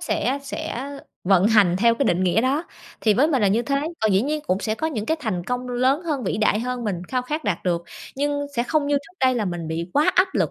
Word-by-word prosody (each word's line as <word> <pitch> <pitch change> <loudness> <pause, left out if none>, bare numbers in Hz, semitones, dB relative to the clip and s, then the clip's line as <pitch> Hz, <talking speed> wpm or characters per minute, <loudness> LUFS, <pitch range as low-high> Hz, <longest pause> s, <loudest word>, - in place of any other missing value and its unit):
sẽ 270 +3 -1
sẽ 280 -2 -5 0.3
vận 195 +1 +4
hành 205 -6 +4
theo 230 +2 +4
cái 275 - 0
định 185 -6 +2
nghĩa 185 +5 +3
đó, 275 +7 0 0.4
thì 215 -2 +3
với 290 +6 +3
mình 265 -8 +1
là 200 - +4
như 220 +5 +2
thế. 275 +2 0 0.2
Còn 220 -2 +2
dĩ 190 +2 +3
nhiên 300 +3 -1
cũng 185 - +1
sẽ 215 -1 -1
có 315 - -2
những 225 -9 -3
cái 320 - +1
thành 185 -9 -2
công 250 +3 -3
lớn 255 +6 +1
hơn, 290 -8 -2
vĩ - - -1
đại 215 0 +2
hơn 250 0 -3
mình 180 -5 -2
khao 255 -1 -1
khát 300 +4 -4
đạt 195 -5 0
được, 170 -2 0 0.3
nhưng 285 +1 -1
sẽ 235 - +2
không 295 +3 0
như 290 - +1
trước 280 +6 -7
đây 255 -1 +4
là 230 -3 0
mình 175 -4 -4
bị 165 +2 -4
quá 310 +5 +3
áp 375 +1 +4
lực - - +1
245 Hz, 270 wpm, -23 LUFS, 205-285 Hz, 0.4 s, vận